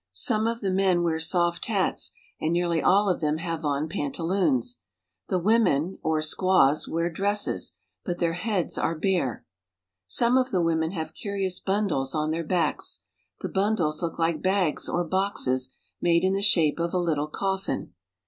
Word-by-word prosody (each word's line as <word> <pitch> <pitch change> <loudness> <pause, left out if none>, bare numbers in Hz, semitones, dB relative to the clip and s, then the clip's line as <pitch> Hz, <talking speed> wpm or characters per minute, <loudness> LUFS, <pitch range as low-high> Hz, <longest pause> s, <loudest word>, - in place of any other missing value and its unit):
Someof 225 - +1
the 195 -2 0
men 185 -2 +2
wear 160 -2 0
soft 175 +1 +2
hats, 200 -4 0 0.3
and 155 - -1
nearly 170 -1 +1
all 200 +2 +4
of 185 - 0
them 150 0 +1
have 165 -1 -4
on 145 +1 0
pantaloons. 160 - -1 0.5
The 185 - 0
women, 185 -4 +2
or 155 -1 0
squaws, 155 -3 +3
wear 165 +1 -1
dresses, 200 +4 -1 0.3
but 175 -3 -3
their 170 -1 0
heads 185 0 -1
are 165 - 0
bare. 160 - -1 0.6
Some 235 - +3
of 255 0 0
the 180 -8 +1
women 160 -1 +1
have 160 -4 -4
curious 195 -3 -2
bundles 190 -10 -1
on 155 0 0
their 165 +1 -2
backs. 165 -1 -1 0.4
The - - -3
bundles 190 -7 0
look 170 -2 -3
like 165 -1 0
bags, 185 -4 0
or 175 - 0
boxes 155 -9 0 0.3
made 170 0 +3
in 190 0 +2
the 195 - 0
shape 170 -7 +3
of 170 +1 -1
a - - +3
little 160 -4 0
coffin. 190 - -3
175 Hz, 165 wpm, -26 LUFS, 155-195 Hz, 0.6 s, all